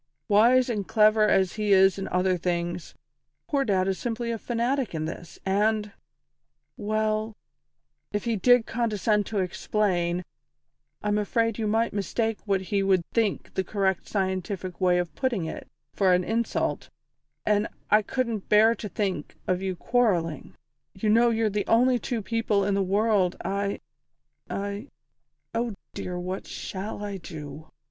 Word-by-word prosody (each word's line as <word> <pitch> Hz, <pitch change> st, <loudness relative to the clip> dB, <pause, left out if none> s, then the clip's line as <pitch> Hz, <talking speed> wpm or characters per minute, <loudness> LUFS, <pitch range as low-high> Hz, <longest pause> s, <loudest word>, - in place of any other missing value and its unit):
Wise 240 Hz, +4 st, +5 dB
and 210 Hz, -5 st, -2 dB
clever 215 Hz, -1 st, +4 dB
as 190 Hz, -3 st, +3 dB
he 210 Hz, -1 st, 0 dB
is 190 Hz, 0 st, +5 dB
in 195 Hz, -, -3 dB
other 185 Hz, 0 st, +1 dB
things, 175 Hz, -1 st, -3 dB, 0.5 s
poor 280 Hz, -3 st, +1 dB
Dad 190 Hz, -5 st, +1 dB
is 190 Hz, -1 st, -1 dB
simply 235 Hz, 0 st, -2 dB
a 230 Hz, -, -3 dB
fanatic 240 Hz, -2 st, -1 dB
in 155 Hz, 0 st, -2 dB
this, 165 Hz, +1 st, -7 dB
and 210 Hz, +2 st, +1 dB, 0.8 s
well, 215 Hz, +1 st, -1 dB, 0.8 s
if 205 Hz, 0 st, -2 dB
he 230 Hz, -1 st, +1 dB
did 245 Hz, +3 st, +5 dB
condescend 210 Hz, -3 st, 0 dB
to 215 Hz, -, -3 dB
explain, 180 Hz, -2 st, 0 dB, 0.8 s
I'm 210 Hz, 0 st, +1 dB
afraid 230 Hz, +1 st, 0 dB
you 220 Hz, -, 0 dB
might 225 Hz, +2 st, +1 dB
mistake 220 Hz, +2 st, -1 dB
what 195 Hz, -2 st, +2 dB
he 195 Hz, +2 st, -1 dB
would 190 Hz, -2 st, +3 dB
think 225 Hz, -4 st, 0 dB
the 190 Hz, -, 0 dB
correct 190 Hz, -2 st, -1 dB
scientific 190 Hz, -1 st, -3 dB
way 180 Hz, -1 st, +4 dB
of 175 Hz, -1 st, -2 dB
putting 240 Hz, -10 st, -1 dB
it, 160 Hz, -, -6 dB, 0.3 s
for 190 Hz, -2 st, +3 dB
an 180 Hz, 0 st, +3 dB
insult, 225 Hz, +4 st, -1 dB, 0.6 s
and 210 Hz, 0 st, +2 dB, 0.2 s
I 210 Hz, +1 st, +6 dB
couldn't 230 Hz, -1 st, -2 dB
bear 220 Hz, +2 st, +6 dB
to 215 Hz, -2 st, -7 dB
think 195 Hz, 0 st, -3 dB
of 185 Hz, 0 st, 0 dB
you 190 Hz, -1 st, -2 dB
quarrelling. 175 Hz, -, 0 dB, 0.4 s
You 210 Hz, +3 st, -1 dB
know 235 Hz, +3 st, +5 dB
you're 225 Hz, -1 st, +1 dB
the 205 Hz, 0 st, -2 dB
only 245 Hz, +2 st, +4 dB
two 230 Hz, -1 st, -3 dB
people 215 Hz, -2 st, +1 dB
in 200 Hz, -, +1 dB
the 195 Hz, -, +2 dB
world 195 Hz, -1 st, +2 dB
I 200 Hz, 0 st, -1 dB, 0.7 s
I 200 Hz, +5 st, -4 dB, 0.7 s
Oh 230 Hz, -2 st, -1 dB, 0.2 s
dear, 180 Hz, -1 st, -4 dB
what 185 Hz, +2 st, -5 dB
shall 205 Hz, +2 st, -5 dB
I 200 Hz, -1 st, -4 dB
do!" 155 Hz, -3 st, -9 dB
205 Hz, 155 wpm, -26 LUFS, 190-225 Hz, 0.8 s, I